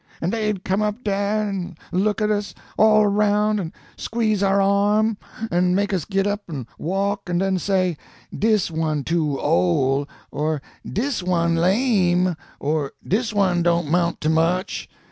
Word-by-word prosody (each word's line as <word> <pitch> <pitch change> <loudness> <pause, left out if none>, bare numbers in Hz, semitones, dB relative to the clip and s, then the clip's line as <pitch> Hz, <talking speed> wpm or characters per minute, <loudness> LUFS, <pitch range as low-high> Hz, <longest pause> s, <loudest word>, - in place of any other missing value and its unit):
An' 170 - -1
dey'd 215 -4 -1
come 190 +3 0
up 210 +3 -2
dah 205 - -1
an' 200 -3 -1 0.2
look 205 +4 +1
at 210 - +2
us 205 -1 -2 0.2
all 215 0 +5
roun', 210 +1 +2
an' 165 -4 -4 0.3
squeeze 220 -3 0
our 195 0 +3
arm, 205 +3 +3 0.4
an' 180 +1 +2
make 200 +1 0
us 180 -6 -1
git 195 -1 0
up 205 +1 -1
an' 140 -7 -5
walk, 195 +4 -1
an' 175 - 0
den 190 0 +1
say, 185 -4 0 0.4
Dis 215 -5 +1
one 155 -2 -1
too 155 -4 0
ole,' 135 +11 +1 0.2
or 155 +1 -1 0.2
'Dis 250 +1 -2
one 170 -2 +1
lame,' 185 -2 +2 0.2
or 145 -1 -1
'Dis 225 +4 0
one 190 -4 +2
don't 170 -3 +1
'mount 170 0 +1
to 155 - +1
much.' 165 +3 0
190 Hz, 160 wpm, -22 LUFS, 170-210 Hz, 0.4 s, all